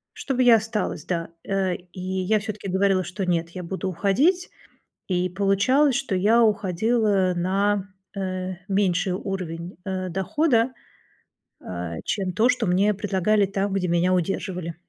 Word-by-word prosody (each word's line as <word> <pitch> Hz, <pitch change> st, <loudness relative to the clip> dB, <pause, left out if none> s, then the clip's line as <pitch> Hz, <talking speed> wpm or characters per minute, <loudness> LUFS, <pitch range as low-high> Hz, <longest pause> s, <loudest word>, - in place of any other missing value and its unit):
чтобы 255 Hz, -2 st, 0 dB
я 235 Hz, -2 st, +8 dB
осталась, 215 Hz, -7 st, -3 dB
да. 165 Hz, -2 st, -2 dB, 0.2 s
Э, 190 Hz, -2 st, 0 dB
и 180 Hz, +1 st, -11 dB
я 190 Hz, +3 st, 0 dB
всё-таки 210 Hz, -1 st, -6 dB
говорила, 190 Hz, 0 st, +2 dB
что 185 Hz, +2 st, -4 dB
нет, 170 Hz, -1 st, 0 dB
я 180 Hz, 0 st, -7 dB
буду 190 Hz, +2 st, -3 dB
уходить, 255 Hz, -, +2 dB, 0.6 s
и 180 Hz, -1 st, +1 dB
получалось, 205 Hz, +9 st, +2 dB
что 270 Hz, -8 st, -1 dB
я 220 Hz, +5 st, +4 dB
уходила 205 Hz, -1 st, +2 dB
на, 195 Hz, +2 st, 0 dB, 0.3 s
э, 185 Hz, -1 st, -3 dB
меньший 190 Hz, -2 st, +1 dB
уровень, 180 Hz, -2 st, -5 dB
э, 185 Hz, -1 st, -3 dB
дохода, 230 Hz, -, +1 dB, 0.9 s
а, 85 Hz, -2 st, -6 dB
чем 190 Hz, -3 st, -1 dB
то, 225 Hz, +3 st, +3 dB
что 240 Hz, -5 st, +1 dB
мне 195 Hz, +4 st, +3 dB
предлагали 200 Hz, 0 st, +1 dB
там 195 Hz, 0 st, -2 dB
где 185 Hz, -2 st, 0 dB
меня 175 Hz, +2 st, +2 dB
удерживали. 180 Hz, -1 st, -2 dB
190 Hz, 140 wpm, -24 LUFS, 180-210 Hz, 0.9 s, я